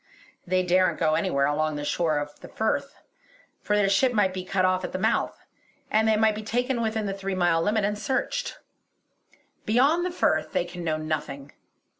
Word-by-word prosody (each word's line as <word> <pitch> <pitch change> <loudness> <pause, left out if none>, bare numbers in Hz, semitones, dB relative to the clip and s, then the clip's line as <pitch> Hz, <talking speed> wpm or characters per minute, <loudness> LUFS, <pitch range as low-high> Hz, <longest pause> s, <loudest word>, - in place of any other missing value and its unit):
They 185 +1 +2
daren't 185 +1 +2
go 155 -2 +2
anywhere 140 -2 +1
along 155 +1 0
the 145 0 -4
shore 160 -1 0
of 145 0 -5
the - - -11
Firth, 275 +6 -2 0.7
for 210 - 0
their 205 -1 +3
ship 245 +6 +3
might 200 -4 +2
be 185 -1 -4
cut 185 0 0
off 185 0 +1
at - - -5
the - - -1
mouth, 190 - -1 0.5
and 220 +1 +3
they 220 -1 +3
might 220 0 +3
be 215 - -5
taken 245 +3 -1
within 220 -1 -1
the 195 - -2
three 195 -1 -4
mile 175 -2 +2
limit 210 +3 +1
and 205 +1 0
searched. - - -2 1.1
Beyond 275 +10 +3
the 360 - -1
Firth 155 - 0
they - - +1
can 175 0 -8
know 155 -2 0
nothing. 150 -3 -4
190 Hz, 195 wpm, -26 LUFS, 165-220 Hz, 1.1 s, their